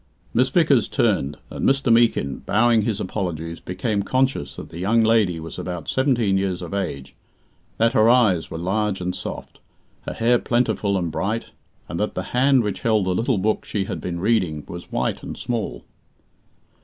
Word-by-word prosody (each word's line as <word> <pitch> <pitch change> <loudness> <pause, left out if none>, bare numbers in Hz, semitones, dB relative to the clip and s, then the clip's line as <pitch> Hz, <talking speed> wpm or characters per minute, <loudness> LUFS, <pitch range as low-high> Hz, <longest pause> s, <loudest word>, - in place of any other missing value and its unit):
Miss - - +3
Vickers - - +3
turned, 70 +2 0
and - - -5
Mr. 135 -3 +3
Meekin, 115 - +2
bowing 115 +2 +3
his 105 -1 -1
apologies, 85 -6 -4
became 100 +3 -2
conscious 130 - 0
that - - -8
the 85 - -9
young 110 +5 +3
lady 110 -7 +3
was 80 +1 -8
about 90 -3 -5
seventeen 120 -8 +2
years 95 -2 -2
of 85 - -7
age, 70 -9 -4 0.6
that 115 +2 +3
her 110 -2 +5
eyes 110 -9 +3
were 80 - -5
large 95 +3 -1
and 90 0 -3
soft, - - -7 0.5
her - - -3
hair 120 +1 +3
plentiful 115 -5 +1
and 85 -3 -2
bright, 105 +9 -2 0.4
and - - -5
that - - -1
the - - -2
hand 130 0 +4
which 100 -3 -3
held 110 -4 +2
the 95 - +1
little 115 +4 +1
book 105 +3 0
she 100 - -2
had - - -5
been 85 -1 -4
reading 90 -7 +1
was 85 0 -9
white - - -1
and - - -7
small. 115 -4 -4
100 Hz, 180 wpm, -22 LUFS, 90-115 Hz, 0.6 s, her